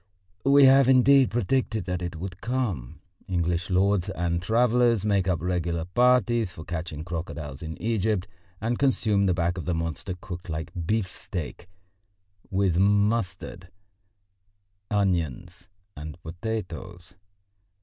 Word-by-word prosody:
We 140 0 +6
have, 135 0 +6
indeed, 130 +1 +6
predicted 120 0 0
that 90 -1 -3
it 85 -1 -4
would 90 +2 -7
come. 95 - -3 0.3
English 85 -1 -1
lords 95 +1 +2
and 85 -2 -1
travellers 120 +1 +2
make 100 -3 +2
up 90 -4 +1
regular 85 -2 -1
parties 120 0 +2
for 80 - -9
catching 80 -3 -5
crocodiles 80 -4 -6
in 80 -1 -6
Egypt, 110 -3 0 0.3
and 115 +2 -1
consume 110 -7 +2
the 90 - +2
back 85 +1 0
of - - -6
the 90 - 0
monster 85 +3 -3
cooked 90 -1 -8
like 80 0 -4
beefsteak, 90 -2 -4 0.8
with 95 -3 +1
mustard, 100 -3 0 1.2
onions 90 - -1 0.3
and 75 +3 -8
potatoes. 90 -1 -6
90 Hz, 120 wpm, -26 LUFS, 85-110 Hz, 1.2 s, We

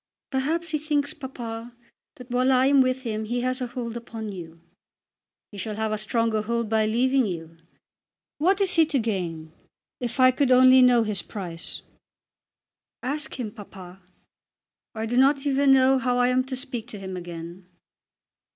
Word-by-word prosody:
"Perhaps 315 +6 -1
he 305 - 0
thinks, 295 -1 0
papa, 235 -3 -7 0.4
that 250 -1 -12
while 255 +2 +2
I 255 0 +4
am 275 0 +5
with 255 0 0
him 220 -2 -3
he 240 +3 -2
has 255 +1 -1
a 250 - -1
hold 240 -1 -5
upon 225 -2 -6
you." 170 -3 -9 0.9
"He 205 - -9
shall 210 +3 -4
have 220 0 -2
a 215 - 0
stronger 220 0 0
hold 235 0 -2
by 220 -1 +2
leaving 255 +2 +2
you. 165 -3 -6 0.8
What 375 +6 +3
is 385 -2 +2
he 325 -2 +5
to 295 -3 0
gain? 175 -9 -3 0.5
If 245 +1 -5
I 255 0 +7
could 265 +1 +1
only 255 0 +7
know 245 -2 +5
his 210 -2 -2
price." 175 -6 -7 1.2
"Ask 295 +3 -3
him, 220 -4 -3
papa." 190 -3 -12 0.9
"I 220 0 -3
do 240 +2 -2
not 275 +2 +4
even 275 0 +3
know 265 0 +5
how 250 0 0
I 245 0 +3
am 255 0 +1
to 265 0 -4
speak 250 -3 -4
to 225 - -8
him 190 -1 -6
again." 175 +1 -8
245 Hz, 170 wpm, -25 LUFS, 215-265 Hz, 1.2 s, I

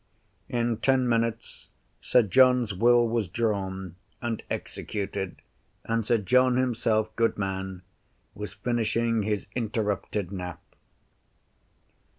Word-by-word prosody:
In 120 -2 0
ten 130 0 +2
minutes, 115 -1 -1 0.3
Sir 125 - +4
John's 125 0 +4
Will 120 +4 +4
was 115 -3 0
drawn, 95 -3 -2 0.2
and 120 -2 -3
executed, 100 -2 -4 0.4
and 115 0 0
Sir 115 +2 +2
John 125 +4 +3
himself, 115 -4 +1
good 115 0 +1
man, 95 -2 -4 0.5
was 105 +1 -6
finishing 115 +1 0
his 105 -1 -1
interrupted 105 -4 -2
nap. 90 -4 -5
110 Hz, 105 wpm, -27 LUFS, 100-120 Hz, 0.5 s, Sir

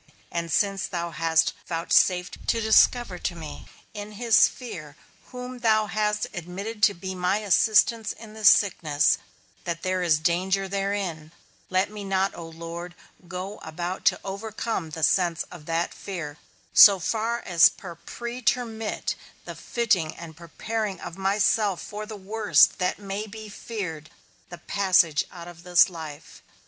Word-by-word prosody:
And 170 -1 -3
since 195 -2 +1
thou 170 -1 -4
hast 165 -1 +2
vouchsafed 180 +2 +1
to 230 - +2
discover 220 -2 +3
to 175 - -3
me, 160 -2 -9 0.3
in 210 0 -7
his 225 -3 +5
fear 165 - -9 0.3
whom 250 0 -8
thou 220 -2 +3
hast 210 0 -1
admitted 195 +5 -6
to 210 -1 +5
be 190 +2 -6
my 180 +2 0
assistance 215 +2 +3
in 220 -2 -11
this 215 -2 +6
sickness, 160 -7 +3 0.4
that 170 -1 -4
there 185 0 0
is 165 -4 +3
danger 185 +5 0
therein, 195 -5 -3 0.4
let 185 +2 +1
me 210 -1 -7
not, 195 0 0
O 170 -1 -8
Lord, 170 +2 -8 0.3
go 185 +4 -6
about 175 +4 -5
to - - +3
overcome 205 -2 -4
the 160 +1 -6
sense 170 -2 +2
of 165 -4 -12
that 165 +1 -1
fear, 155 -6 -7 0.3
so 200 -2 +9
far 225 +6 -1
as 170 -4 +5
to 175 -3 -10
pretermit 235 -2 -2 0.3
the - - -6
fitting 190 -10 0
and 165 -2 -10
preparing 195 +4 -4
of 170 - -8
myself 195 0 +1
for 210 +1 -7
the 215 -1 -7
worst 200 -5 +3
that 180 0 0
may 205 +1 -5
be 215 0 -9
feared, 180 -9 -6 0.4
the 175 - -9
passage 185 -6 +2
out 170 -1 -10
of 170 -1 -12
this 180 +1 +5
life. 155 -4 -9
190 Hz, 150 wpm, -25 LUFS, 170-215 Hz, 0.4 s, so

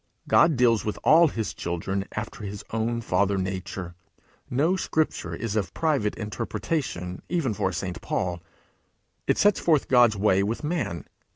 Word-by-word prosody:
'God 160 -2 +5
deals 120 -3 +3
with 105 - -3
all 165 +2 +7
his 110 -7 -3
children 95 +3 -3
after 105 0 -5
his 100 0 -6
own 115 +1 -1
father 100 -1 +1
nature. 95 -1 -4 0.6
No 155 +9 +2
scripture 155 - -1
is 110 +3 -4
of 100 -6 -2
private 145 -10 +1
interpretation 105 - -3
even 165 -10 0
for 95 - 0
a - - -6
St. 90 +2 -4
Paul. 90 -2 -2 0.9
It - - +2
sets 205 0 +4
forth 155 -4 +2
God's 120 -4 +5
way 100 -1 +3
with 110 +8 -2
man. 150 - -2
105 Hz, 155 wpm, -26 LUFS, 95-135 Hz, 0.9 s, all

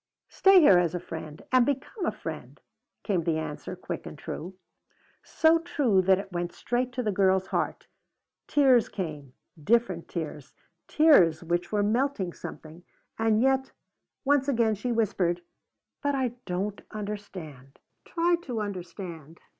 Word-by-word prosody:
"Stay 390 -1 +6
here 195 - +7
as 175 -1 0
a - - -1
friend 160 -3 -8
and 255 -1 +6
become 285 - -2
a - - +2
friend," - - -8 0.4
came 190 -5 0
the 160 -1 0
answer, 155 -2 -5
quick - - -6
and - - -9
true. 180 +4 -7 0.7
So 325 +1 +3
true 280 - +2
that 190 0 +4
it 195 0 -7
went 175 0 -3
straight 245 +1 -2
to 250 0 -2
the 215 - 0
girl's 190 -1 +2
heart. - - -2 0.6
Tears 260 -6 +4
came, 150 -9 -6 0.3
different 205 -4 +1
tears, 150 -4 -6 0.3
tears 185 - +5
which 175 +1 -1
were 205 -1 +1
melting 215 -4 0
something. 160 +2 -10 0.4
And 225 0 +3
yet, 265 0 +1 0.5
once 285 -1 +3
again 230 -5 +2
she 215 +4 -3
whispered: 185 -6 0 0.6
"But 285 -1 0
I 260 -2 +1 0.2
don't 195 +3 -3
understand." 185 -10 -7 0.3
"Try 345 0 +1
to 250 -9 -4
understand. 175 -5 -7
200 Hz, 145 wpm, -27 LUFS, 175-255 Hz, 0.7 s, here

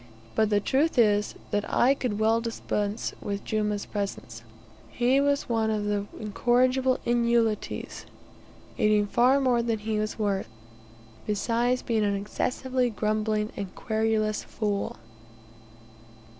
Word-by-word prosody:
But 220 -1 +2
the 205 -1 +3
truth 280 +9 +1
is, 210 -3 +3 0.2
that 205 - +1
I 255 +3 +4
could 250 -6 -3
well 220 +1 +2
dispense 215 -2 -2
with 200 0 -4
Jumah's 210 -1 -1
presence: 195 - -5 0.5
he 255 +3 +2
was 285 0 +1
one 225 -2 +1
of 210 -1 -1
the 205 -1 -1
incorrigible 255 +4 +2
inutiles, 235 -2 0 0.7
eating 210 -1 +3
far 250 +6 +3
more 250 -3 +2
than 230 -1 0
he 215 0 -2
was 215 0 -3
worth; 200 -3 -1 0.8
besides 235 +4 0
being 225 -2 +1
an 200 -1 +1
excessively 250 +5 -1
grumbling 215 0 -1
and 195 -2 -6
querulous 220 -1 0
fool. 205 -2 -3
220 Hz, 125 wpm, -27 LUFS, 210-240 Hz, 0.8 s, I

